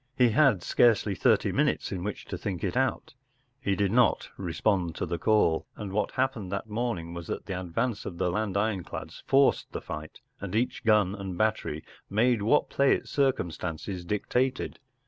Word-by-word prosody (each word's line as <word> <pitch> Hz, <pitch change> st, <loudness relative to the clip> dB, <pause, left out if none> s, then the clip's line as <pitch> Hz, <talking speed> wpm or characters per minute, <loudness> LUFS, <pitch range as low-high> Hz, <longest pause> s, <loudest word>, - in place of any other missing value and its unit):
He 125 Hz, -2 st, +5 dB
had 115 Hz, -, +4 dB
scarcely 110 Hz, -4 st, +3 dB
thirty -, -, +2 dB
minutes -, -, 0 dB
in 90 Hz, -2 st, -3 dB
which 105 Hz, +1 st, -5 dB
to -, -, -5 dB
think 95 Hz, -4 st, -4 dB
it 95 Hz, -, -1 dB
out. 130 Hz, +4 st, 0 dB, 0.5 s
He 100 Hz, -6 st, 0 dB
did 100 Hz, -1 st, +1 dB
not 120 Hz, 0 st, +3 dB
respond 90 Hz, -6 st, 0 dB
to -, -, -2 dB
the 85 Hz, -1 st, -3 dB
call, 105 Hz, -6 st, +2 dB
and 100 Hz, -3 st, -6 dB
what 105 Hz, +1 st, +1 dB
happened 125 Hz, -8 st, -1 dB
that 100 Hz, +2 st, -3 dB
morning 105 Hz, -7 st, -3 dB
was 85 Hz, -1 st, -7 dB
that -, -, -4 dB
the 95 Hz, -2 st, -4 dB
advance 105 Hz, +6 st, -2 dB
of 85 Hz, -, -6 dB
the 90 Hz, -, 0 dB
land 105 Hz, 0 st, -1 dB
ironclads 100 Hz, -3 st, -3 dB
forced 135 Hz, 0 st, +3 dB
the -, -, -3 dB
fight, 75 Hz, 0 st, -8 dB, 0.2 s
and 100 Hz, 0 st, -5 dB
each 120 Hz, +3 st, 0 dB
gun 105 Hz, -4 st, +4 dB
and 95 Hz, -3 st, -5 dB
battery 110 Hz, -8 st, 0 dB, 0.3 s
made 115 Hz, +2 st, +2 dB
what 115 Hz, +8 st, +3 dB
play 140 Hz, 0 st, +4 dB
its -, -, -7 dB
circumstances 90 Hz, -, -1 dB
dictated. 125 Hz, +7 st, -1 dB
105 Hz, 180 wpm, -28 LUFS, 90-120 Hz, 0.5 s, He